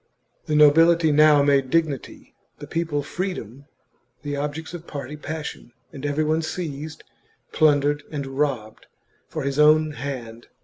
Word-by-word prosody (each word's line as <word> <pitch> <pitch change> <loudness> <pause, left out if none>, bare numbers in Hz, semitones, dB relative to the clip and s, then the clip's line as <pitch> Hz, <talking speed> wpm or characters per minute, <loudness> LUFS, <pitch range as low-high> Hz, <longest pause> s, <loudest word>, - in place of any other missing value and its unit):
The 150 - 0
nobility 160 +2 +5
now 150 -1 +6
made 140 -2 +2
dignity, 155 -4 -2 0.2
the - - -9
people 160 -3 -2
freedom, 140 - -5 0.6
the 145 -1 -3
objects 150 +3 -4
of 170 -1 -8
party 140 0 -6
passion, 150 -4 -7 0.2
and 145 0 -5
every 145 +2 0
one 155 +1 +1
seized, 155 -2 -6 0.5
plundered, 145 -1 +3
and 145 -3 -4
robbed, 135 -5 -3 0.4
for 155 - -5
his 140 +1 -2
own 155 +1 +5
hand. 125 -5 -7
150 Hz, 135 wpm, -23 LUFS, 140-155 Hz, 0.6 s, now